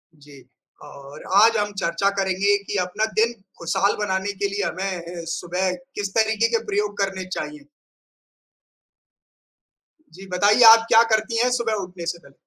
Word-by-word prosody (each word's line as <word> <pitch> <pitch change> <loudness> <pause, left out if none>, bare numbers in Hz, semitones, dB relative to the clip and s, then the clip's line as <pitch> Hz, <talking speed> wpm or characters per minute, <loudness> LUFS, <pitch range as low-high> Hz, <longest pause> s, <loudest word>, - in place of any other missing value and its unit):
जी, 145 -2 -16 0.4
और 140 +2 -12
आज 225 +2 +5
हम 205 0 -1
चर्चा 170 +4 0
करेंगे 195 +1 +1
कि 205 - -4
अपना 180 +5 -2
दिन 230 +2 +2 0.2
खुशहाल 190 +4 0
बनाने 195 -1 -2
के 200 +1 -2
लिए 200 0 -3
हमें 175 -3 -5
सुबह 180 +3 -2 0.2
किस 205 -1 -3
तरीक़े 220 0 +2
के 230 -1 -1
प्रयोग 205 0 -2
करने 195 -2 -2
चाहिए। 285 +10 -6 2.5
जी, 190 +3 -12
बताइए 205 +6 +4
आप 225 0 +3
क्या 225 +1 +6
करती 220 +2 0
हैं 250 - +2
सुबह 235 -3 -1
उठने 180 -2 -9
से 170 0 -4
पहले? 140 - -20
200 Hz, 150 wpm, -22 LUFS, 180-215 Hz, 2.5 s, क्या